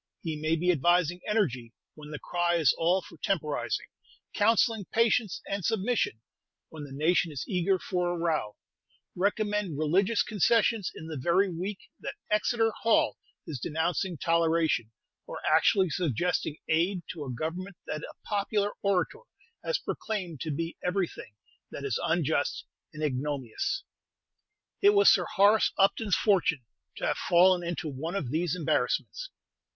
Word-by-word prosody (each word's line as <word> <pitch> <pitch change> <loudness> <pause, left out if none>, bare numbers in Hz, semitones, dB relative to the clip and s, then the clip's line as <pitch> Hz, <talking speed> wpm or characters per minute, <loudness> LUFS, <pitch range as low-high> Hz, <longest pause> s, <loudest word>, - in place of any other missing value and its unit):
He 160 -2 -2
may 155 +2 0
be 180 +2 +2
advising 175 +2 +2
energy 130 - 0 0.2
when 150 -1 -12
the 150 - -5
cry 175 +1 0
is 160 -6 +4
all 175 +3 +2
for - - -14
temporizing; 155 -5 -1 0.5
counselling 225 0 +2
patience 230 -2 +1
and 200 -1 -3
submission, 220 - 0 0.5
when 155 -2 -8
the 140 - -12
nation 160 +4 +1
is 140 -4 -5
eager 185 +1 +1
for 180 -1 -1
a 175 - -2
row; 160 -11 -1 0.6
recommend 205 -3 0
religious 190 +8 +2
concessions 215 0 +2
in 160 - -8
the 160 -3 -5
very 185 +5 +2
week 185 +4 -4 0.2
that - - -6 0.2
Exeter 225 +2 +2
Hall 225 -1 +2 0.3
is 145 -5 -5
denouncing 170 +5 -1
toleration; 165 -8 +1 0.4
or - - -6
actually 190 -4 +4
suggesting 160 0 -1
aid 175 +3 +1
to 160 -4 -6
a 135 - -5
Government 170 +9 -4
that 155 - -4
a - - -9
popular 205 0 0
orator 195 -3 0 0.4
has - - 0
proclaimed 180 -9 -4
to 160 - -3
be 165 +3 -3
everything 180 - -3 0.3
that - - -7
is - - -1
unjust - - 0 0.3
and 155 0 -7
ignominious. 145 - -2 1.0
It 405 0 +6
was 405 +1 +7
Sir - - +1
Horace 205 +2 +5
Upton's 200 +1 +3
fortune 180 - +2 0.3
to - - -3
have - - 0
fallen 180 +1 +5
into 170 -2 -3
one 155 +6 -4
of 140 -11 -3
these 165 +2 0
embarrassments. 180 - -1
175 Hz, 145 wpm, -28 LUFS, 155-200 Hz, 1.0 s, was